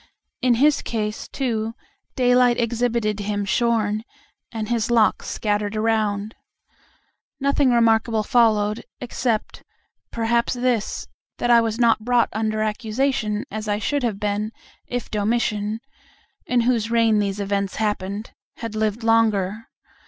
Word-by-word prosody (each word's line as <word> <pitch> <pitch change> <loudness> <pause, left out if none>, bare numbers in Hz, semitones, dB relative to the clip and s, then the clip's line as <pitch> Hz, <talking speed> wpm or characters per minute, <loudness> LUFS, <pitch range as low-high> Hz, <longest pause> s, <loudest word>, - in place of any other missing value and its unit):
In 250 -2 +3
his 290 +5 +3
case, 215 -2 -3
too, 230 -4 -2 0.4
daylight 245 -1 +4
exhibited 230 -2 0
him 205 0 -2
shorn, 215 -1 +1 0.5
and 220 -2 -4
his 230 -1 0
locks 230 -2 +2
scattered 205 0 -1
around. 215 -1 0 1.1
Nothing 280 0 +2
remarkable 225 -1 +3
followed, 215 -3 +2 0.2
except, 240 -2 -2 0.5
perhaps, 235 +1 0
this, 245 -3 -1 0.3
that 240 - +1
I 235 -1 +7
was 225 -1 -1
not 230 -2 +4
brought 240 +1 +2
under 215 0 -1
accusation, 220 0 -1
as 215 +1 -5
I 205 0 +1
should 285 +7 -1
have 225 -5 -1
been, 210 +1 -1 0.4
if 245 -2 -4
Domitian 210 0 0 0.7
(in 250 -1 +2
whose 230 -2 +1
reign 230 -2 +3
these 200 -1 -1
events 200 -1 -1
happened) 210 0 -2 0.3
had 230 -2 -5
lived 215 +1 -1
longer. 220 -2 +2
225 Hz, 125 wpm, -22 LUFS, 210-235 Hz, 1.1 s, I